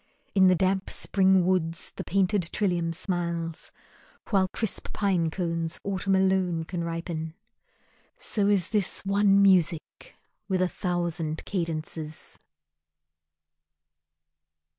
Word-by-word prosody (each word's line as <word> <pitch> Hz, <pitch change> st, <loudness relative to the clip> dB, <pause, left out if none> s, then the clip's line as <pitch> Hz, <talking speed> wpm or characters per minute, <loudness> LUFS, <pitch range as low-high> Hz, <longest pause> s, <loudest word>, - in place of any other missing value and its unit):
In 190 Hz, -2 st, +5 dB
the 185 Hz, -, +5 dB
damp 190 Hz, +2 st, 0 dB
Spring 190 Hz, -2 st, +3 dB
woods 170 Hz, -3 st, 0 dB
The -, -, -5 dB
painted 190 Hz, -2 st, +1 dB
trillium 175 Hz, -5 st, 0 dB
smiles, 170 Hz, -2 st, -3 dB, 0.6 s
while 190 Hz, -2 st, +3 dB
crisp 220 Hz, +2 st, -2 dB
pine 185 Hz, -5 st, +1 dB
cones 165 Hz, -1 st, -2 dB
Autumn 195 Hz, 0 st, 0 dB
alone 190 Hz, -3 st, +1 dB
can 170 Hz, +1 st, -4 dB
ripen. 165 Hz, -1 st, -4 dB, 0.8 s
So 205 Hz, -2 st, 0 dB
is 195 Hz, -3 st, +2 dB
this 205 Hz, -3 st, 0 dB
One 200 Hz, 0 st, +4 dB
music 175 Hz, -4 st, +1 dB, 0.3 s
with 190 Hz, -2 st, 0 dB
a -, -, +2 dB
thousand 170 Hz, -4 st, -2 dB
cadences. 160 Hz, -3 st, -4 dB
180 Hz, 105 wpm, -27 LUFS, 165-195 Hz, 0.8 s, In